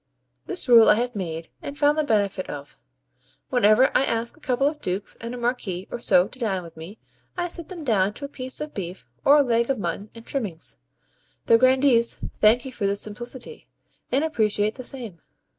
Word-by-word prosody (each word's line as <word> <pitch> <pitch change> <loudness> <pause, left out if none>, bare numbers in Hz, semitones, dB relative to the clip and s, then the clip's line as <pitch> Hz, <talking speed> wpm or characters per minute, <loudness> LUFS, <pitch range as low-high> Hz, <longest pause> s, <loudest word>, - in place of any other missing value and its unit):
This 365 -5 +1
rule 235 -2 +8
I - - +7
have 240 +1 -2
made, 165 -4 -5
and 280 - -7
found 290 0 +3
the 310 - +1
benefit 205 -7 0
of. 145 -1 -8 0.7
Whenever 245 +1 +4
I - - +5
ask 230 -2 -1
a - - -22
couple 270 -3 0
of 295 +1 -1
Dukes 185 +2 -3
and 235 +2 -5
a - - -7
Marquis 235 -7 -2
or - - -4
so 180 -5 +4
to 255 - -12
dine 195 -6 -1
with 165 -1 -12
me, 165 +7 -10 0.4
I 350 0 -1
set 340 -1 -6
them 350 -4 -7
down 205 -6 +1
to 285 - -6
a - - -5
piece 260 -2 -5
of 300 0 -6
beef, 185 -1 -7 0.2
or 285 - +6
a 295 - +6
leg 235 -1 +1
of 270 - +1
mutton 200 +2 -4
and 230 0 -12
trimmings. 205 - -3 0.7
The 230 - +5
grandees 255 -2 +4 0.2
thank 225 +4 +4
you 265 - -6
for 210 -5 -2
this 200 +1 0
simplicity, 240 - -6 0.4
and 270 +4 +2
appreciate 215 -8 +1
the 255 - -9
same. 235 - -5
235 Hz, 205 wpm, -24 LUFS, 200-265 Hz, 0.7 s, rule